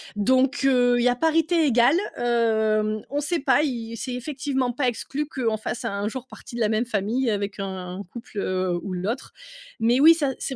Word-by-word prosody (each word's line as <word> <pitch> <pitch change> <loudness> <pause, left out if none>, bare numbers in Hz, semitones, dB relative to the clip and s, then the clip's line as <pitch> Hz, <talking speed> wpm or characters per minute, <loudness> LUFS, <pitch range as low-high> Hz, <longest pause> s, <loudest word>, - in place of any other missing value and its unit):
donc, 260 +6 +2
heu, 250 -2 +4
il 240 - +1
y 250 - +4
a 245 - +1
parité 325 +2 +2
égale. 245 +4 +4 0.2
Hem, 220 -2 +1
on 285 - -1
sait 325 +4 -1
pas. 270 0 +3
Y 230 -5 -3
c'est 255 +2 -4
effectivement 260 0 -2
pas 255 +2 -1
exclu 275 +5 -3
qu'on 235 -7 -1
fasse 230 +3 -5
un 200 -2 -2
jour 255 +3 -6
partie 255 - -12
de 240 - -3
la 215 - +2
même 220 +2 +1
famille 230 +3 -1
avec 200 -1 -2
un 190 -1 -5
couple, 235 -3 -10
heu, 185 -2 -1
ou 195 - -5
l'autre 205 +9 -4 0.5
mais 235 +3 +3
oui, 320 +4 +8
ça, 295 -4 0
c'est 270 - -3
240 Hz, 200 wpm, -24 LUFS, 215-265 Hz, 0.5 s, oui